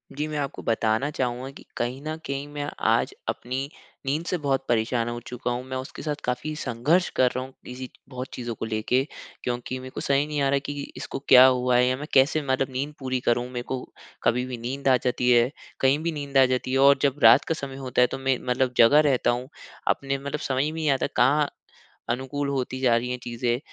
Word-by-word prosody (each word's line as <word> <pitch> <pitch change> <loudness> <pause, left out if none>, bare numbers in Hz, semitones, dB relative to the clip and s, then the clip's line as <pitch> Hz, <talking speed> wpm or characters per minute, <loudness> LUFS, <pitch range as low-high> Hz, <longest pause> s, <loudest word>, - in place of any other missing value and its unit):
जी, 150 +2 -2
मैं 150 - -4
आपको 140 -2 -3
बताना 115 +4 +1
चाहूँगा 130 -1 -2
कि - - -13
कहीं 125 +3 -2
न 155 +1 -3
कहीं 140 +1 -3
मैं 145 0 -4
आज - - +2
अपनी 130 +3 -3 0.4
नींद 150 +5 -1
से 180 - -1
बहुत 135 -3 -1
परेशान 115 0 +1
हो 120 0 -4
चुका 125 0 -3
हूँ। 120 +1 -3
मैं 130 0 -3
उसके 130 +1 -7
साथ 150 -2 -2
काफ़ी 125 +5 -2
संघर्ष 150 +6 +1
कर 125 -1 +4
रहा 130 - -1
हूँ 130 - -10
किसी 125 0 -7 0.2
बहुत 130 -1 -5
चीज़ों 120 -2 -4
को - - -4
लेके। 110 +4 +1 0.4
क्योंकि 125 +1 -3
मेरे 130 0 -8
को - - -3
सही 140 +1 +2
नहीं 150 -1 -2
आ 140 - +2
रहा 140 0 +2
कि 145 0 -4 0.2
इसको - - -5
क्या 130 0 +10
हुआ 125 -1 +3
है? 125 - +5
या 130 - +2
मैं 150 +2 -6
कैसे 140 +3 +4
मतलब 135 -1 0
नींद 140 +4 -3
पूरी 130 -2 -1
करूँ? 120 0 +2
मेरे 120 -1 -4
को 130 -1 -3 0.4
कभी 125 +1 +2
भी 130 -1 -5
नींद 130 +4 -4
आ 130 - +6
जाती 125 0 +1
है, 120 0 +5 0.3
कहीं 135 +2 +3
भी 170 - 0
नींद 140 -3 -3
आ 135 - +8
जाती 130 0 -1
है 135 - +2
और 140 +1 +7
जब 140 0 +1
रात - - +8
का - - 0
समय 140 -3 -6
होता 130 -2 0
है 125 - +6
तो - - -3
मैं 135 -1 +1
मतलब 125 0 +1
जगा 120 +6 +7
रहता 125 -2 +2
हूँ। 125 +1 -3 0.4
अपने 135 0 0
मतलब 140 +2 -4
समझ 135 -2 0
में 150 - -1
नहीं 160 -1 -1
आता 135 -1 +2
कहाँ 145 +4 +4 0.6
अनुकूल 135 +4 -2
होती 130 -1 -2
जा 125 -3 +4
रही 120 +1 -2
हैं 125 - -2
चीज़ें। 120 0 -1
130 Hz, 230 wpm, -25 LUFS, 125-140 Hz, 0.6 s, क्या